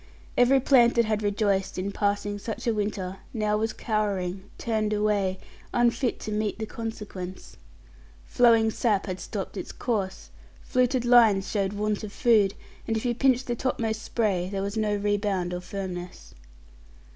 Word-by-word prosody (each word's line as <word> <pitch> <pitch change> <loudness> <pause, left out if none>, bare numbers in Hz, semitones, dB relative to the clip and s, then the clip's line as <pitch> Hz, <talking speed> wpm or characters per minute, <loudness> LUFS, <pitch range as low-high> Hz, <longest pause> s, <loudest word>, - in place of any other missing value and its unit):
Every 250 +2 +5
plant 245 -3 +5
that 235 -1 +4
had 215 -1 0
rejoiced 205 -2 0
in 190 +2 -2
passing 205 0 -1
such 220 +2 -5
a 230 - +2
winter 200 -3 -3 0.2
now 210 -1 +1
was 220 +1 0
cowering, 200 -4 -2
turned 215 -2 -1
away, 205 -3 +1 0.4
unfit 240 +1 +2
to 215 - -5
meet 210 0 -1
the 220 - -3
consequence. 210 -5 -7 0.7
Flowing 230 -2 +4
sap 210 -4 +1
had 185 -1 -4
stopped - - -5
its - - -5
course; 200 -6 -3 0.3
fluted 250 -1 +1
lines 225 -5 +5
showed 200 -2 0
want 210 +1 -1
of 210 - -6
food, 210 -4 +3 0.3
and 225 - 0
if 220 - -4
you 240 - +2
pinched 255 +1 +2
the 240 - -2
topmost 225 -3 -1
spray, 195 -7 0
there 195 -1 -2
was 200 +2 -3
no 215 -1 +1
rebound 200 -3 0
or 180 - -3
firmness. 180 - -7
210 Hz, 155 wpm, -26 LUFS, 195-230 Hz, 0.7 s, Every